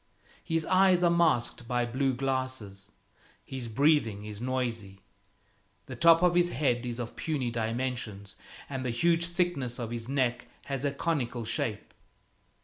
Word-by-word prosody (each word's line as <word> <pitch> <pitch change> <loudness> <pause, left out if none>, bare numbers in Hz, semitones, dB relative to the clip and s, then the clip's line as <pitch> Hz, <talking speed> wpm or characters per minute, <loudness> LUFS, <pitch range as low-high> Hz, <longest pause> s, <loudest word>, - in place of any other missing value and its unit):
His 165 -1 0
eyes 185 -1 +4
are 170 - +5
masked 155 -8 +2
by 120 0 +1
blue 130 +2 0
glasses; 130 -7 -3 0.6
his 130 -3 -5
breathing 115 -5 +2
is 105 0 -7
noisy. 115 -6 -3 0.8
The 130 - -7
top 165 +5 +6
of 180 -1 +5
his 175 0 +3
head 125 -5 0
is 120 -1 -4
of 120 -1 -5
puny 140 -7 -2
dimensions, 115 -3 -3 0.3
and 135 -2 -4
the 130 - -1
huge 170 +8 +2
thickness 170 -9 -1
of 120 -3 -4
his 120 0 -5
neck 130 -3 0 0.2
has 135 -1 -3
a 140 - +1
conical 135 -6 -2
shape. - - -3
130 Hz, 145 wpm, -29 LUFS, 115-155 Hz, 0.8 s, top